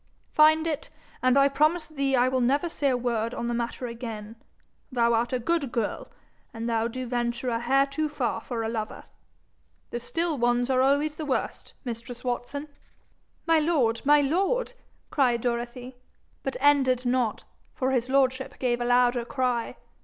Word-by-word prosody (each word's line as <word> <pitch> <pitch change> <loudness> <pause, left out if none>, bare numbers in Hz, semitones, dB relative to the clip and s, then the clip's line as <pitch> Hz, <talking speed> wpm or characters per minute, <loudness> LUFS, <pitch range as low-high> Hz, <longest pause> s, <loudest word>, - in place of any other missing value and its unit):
'Find 315 +1 +5
it, 310 -2 -3 0.3
and 255 +1 +4
I 275 0 +6
promise 305 +4 +2
thee 275 -3 -1
I 250 0 +4
will 255 0 +1
never 280 +7 +2
say 285 -4 0
word 235 -2 -1
on 235 - -3
the 240 - -1
matter 235 +1 -3
again. 230 -2 -6 0.6
Thou 235 -2 +2
art 230 +1 +1
a 255 - +1
good 280 +1 -1
girl, 230 -4 -2 0.5
and 225 +1 -4
thou 230 -1 +1
do 255 +2 -5
venture 240 +1 -2
a 230 -1 0
hair 270 +3 +3
too 300 +2 -2
far 245 -6 -2
for 230 -1 -4
a - - -1
lover. 220 -1 -4 0.9
The 240 - -3
still 325 +4 -2
ones 240 +1 +2
are 255 0 +3
always 285 +3 +2
the 310 - -4
worst, 260 - -3
mistress 240 +1 -6
Watson.' 255 +4 -3 0.8
'My 330 -1 +4
lord! 280 -8 +1
my 295 +1 +5
lord!' 390 - 0 0.4
cried 250 -5 +2
Dorothy, 245 +1 -3 0.4
but 270 - -3
ended 265 -3 +3
not, 245 -3 0 0.3
for 260 0 0
his 250 -1 0
lordship 265 -1 +1
gave 245 -2 0
a - - 0
louder 245 0 +3
cry. 250 -2 -1
255 Hz, 170 wpm, -26 LUFS, 240-280 Hz, 0.9 s, I